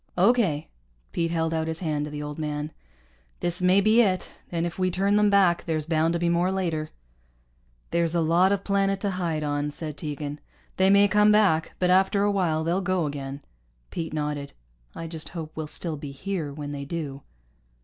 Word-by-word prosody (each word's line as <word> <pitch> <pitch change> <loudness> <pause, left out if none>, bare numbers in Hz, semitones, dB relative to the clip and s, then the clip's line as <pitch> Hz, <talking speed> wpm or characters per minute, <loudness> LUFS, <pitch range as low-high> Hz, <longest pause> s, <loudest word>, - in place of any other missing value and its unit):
"Okay." 190 -7 +3 0.4
Pete 165 -1 0
held 165 -1 0
out 160 0 -1
his 160 0 -3
hand 150 -4 -1
to - - -6
the 150 0 -5
old 150 +1 -6
man. 150 0 -3 0.7
"This 175 +1 -1
may 185 +2 +5
be 215 +3 +5
it. 190 -5 0 0.2
And 170 -1 0
if 175 +2 -5
we 185 0 +2
turn 195 +3 +1
them 210 0 +4
back, 190 -4 +3
there's 155 -2 -1
bound 160 0 +1
to 170 - 0
be 175 - +1
more 170 +2 +2
later." 165 -5 -1 1.0
"There's 170 0 +1
a - - +3
lot 170 +4 +4
of 200 -1 0
planet 195 -1 +1
to 200 - 0
hide 170 -4 -2
on," 145 0 -1
said 150 0 -6
Tegan. 150 -1 -5 0.4
"They 190 0 +4
may 200 +1 +6
come 210 +1 +5
back, 195 -7 +3
but 180 0 +2
after 195 +2 +4
a 205 - +3
while 170 -5 +1
they'll 175 +4 0
go 185 -2 0
again." 140 -1 -5 0.5
Pete 165 -1 -4
nodded. 150 -2 -3 0.4
"I 165 - -5
just 160 -1 -6
hope 160 -1 -5
we'll 155 -1 -4
still 160 0 -4
be 145 0 -7
here 160 +2 -4
when 145 0 -6
they 140 -1 -5
do." 145 -2 -5
165 Hz, 200 wpm, -26 LUFS, 150-190 Hz, 1.0 s, may